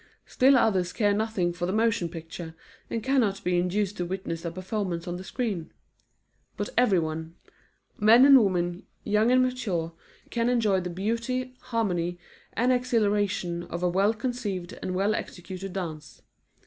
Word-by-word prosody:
Still 265 +1 +4
others 190 -7 +2
care 205 -2 +2
nothing 205 -5 0
for 175 0 -3
the - - -1
motion 225 -4 +1
picture, 165 0 -8 0.3
and 225 - -3
cannot 240 -7 +1
be 180 0 +2
induced 195 +3 -1
to 180 - -1
witness 175 -2 -4
a 170 - -2
performance 185 -1 -3
on 175 0 -3
the 185 - -8
screen. 200 -7 -3 0.9
But 205 - -2
everyone 165 -8 +1 0.6
men 225 +5 +7
and 275 -4 +8
women, 175 -2 -1 0.2
young 215 +3 +2
or 255 - +5
mature, 225 -11 0 0.4
can 235 0 +1
enjoy 220 -6 +2
the 180 -1 -4
beauty, 235 +7 -2
harmony, 180 -7 -1 0.4
and 245 +3 +2
exhilaration 205 -8 0
of 170 +1 -5
a 180 - +3
well 195 +5 +2
conceived 210 -7 -3
and 185 - -3
well 200 +3 +2
executed 185 0 -6
dance. 160 -6 -6
195 Hz, 150 wpm, -27 LUFS, 175-230 Hz, 0.9 s, and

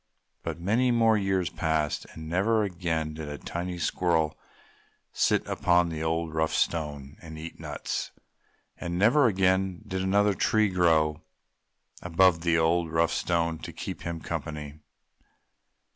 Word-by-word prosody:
But, - - -5
many 110 +8 +2
more 115 -2 +4
years 95 -4 0
passed, 80 -2 -1
and 80 0 -9
never 105 +6 +2
again 85 -5 -2
did 80 -1 -7
a 75 - -5
tiny 90 +3 -5
squirrel 80 -3 +1 0.8
sit - - +2
upon 85 0 +2
the 80 -1 -5
old, 80 0 -1
rough 80 0 0
Stone 75 -3 -2
and 80 -2 -9
eat 80 +1 -8
nuts. - - -4 0.7
And 85 -1 -3
never 120 +8 +5
again 95 -2 +1
did 95 0 -3
another 100 +2 +3
tree 110 +2 +2
grow 80 -4 +2 0.8
above 90 0 +3
the 85 -1 +2
old, 80 +1 +2
rough 80 0 +2
Stone 85 -2 0
to - - -7
keep - - -6
him 85 -1 -5
company. 75 -1 -5
85 Hz, 140 wpm, -27 LUFS, 80-95 Hz, 0.8 s, never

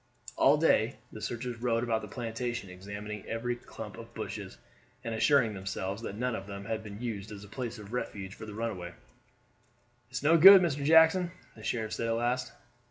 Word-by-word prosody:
All 140 +3 +5
day 140 -6 +3 0.2
the 110 - -9
searchers 120 0 -4
rode 120 -1 +1
about 115 -2 0
the - - -7
plantation 120 -4 -4
examining 100 +2 -7
every 120 +2 -2
clump 120 - -9
of - - -12
bushes, - - -6 0.5
and 115 - -3
assuring 115 -1 +3
themselves 95 +1 -4
that 100 - -5
none 125 +1 -1
of 95 -2 -6
them 100 0 -7
had 110 +1 -2
been 105 -1 -8
used 110 -4 -5
as 100 -1 -8
a - - -11
place 120 +2 -5
of 105 +1 -10
refuge 100 -6 -4
for 110 - -9
the 105 - -8
runaway. 95 -6 -4 1.1
"It's 125 +1 -5
no 165 +3 +5
good, 195 +4 +12
Mr. 150 -6 0
Jackson," 160 +4 +6 0.3
the 110 - -13
sheriff 110 -1 -2
said 115 - -2
at 115 - +1
last. 125 +2 -1
115 Hz, 190 wpm, -30 LUFS, 105-125 Hz, 1.1 s, good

